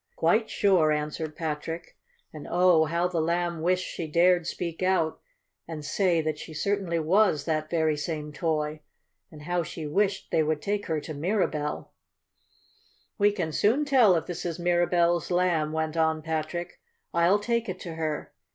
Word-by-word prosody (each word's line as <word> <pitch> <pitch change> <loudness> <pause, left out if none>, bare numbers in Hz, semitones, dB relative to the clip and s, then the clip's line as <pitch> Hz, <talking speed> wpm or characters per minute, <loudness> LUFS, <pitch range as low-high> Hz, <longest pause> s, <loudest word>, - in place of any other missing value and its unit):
"Quite 215 +7 +2
sure," 185 -6 +3
answered 150 +1 -3
Patrick, 160 +1 -5 0.4
and, 155 -2 -9
oh, 175 -3 +4
how 170 +3 0
the 175 -2 -1
Lamb 170 0 -1
wished 180 +2 +1
she 165 - -5
dared 175 +2 +3
speak 170 -1 -4
out 185 -4 +1 0.5
and 155 -3 -6
say 175 +1 +2
that 155 -1 -3
she 155 - -9
certainly 195 -1 -1
was 165 -1 +2
that 155 -1 -1
very 160 -2 +1
same 150 0 -4
toy! 155 -2 -1 0.5
And 150 -1 -12
how 175 +2 0
she 160 0 -6
wished 195 +5 0
they 160 - +3
would 155 0 0
take 205 +5 -2
her 160 -2 0
to 155 - -7
Mirabell! 155 -2 -2 1.3
"We 205 0 +5
can 180 -6 -3
soon 235 - +2
tell 250 -10 +5
if 165 -1 -1
this 175 -1 -5
is 170 -1 -3
Mirabell's 175 -1 +2
Lamb," 175 -4 +1
went 160 0 -2
on 160 -1 +1
Patrick. 160 +2 -4 0.3
"I'll 170 +4 +4
take 230 +1 -1
it 185 0 -5
to 170 - -6
her. 155 -2 -4
170 Hz, 165 wpm, -27 LUFS, 155-180 Hz, 1.3 s, We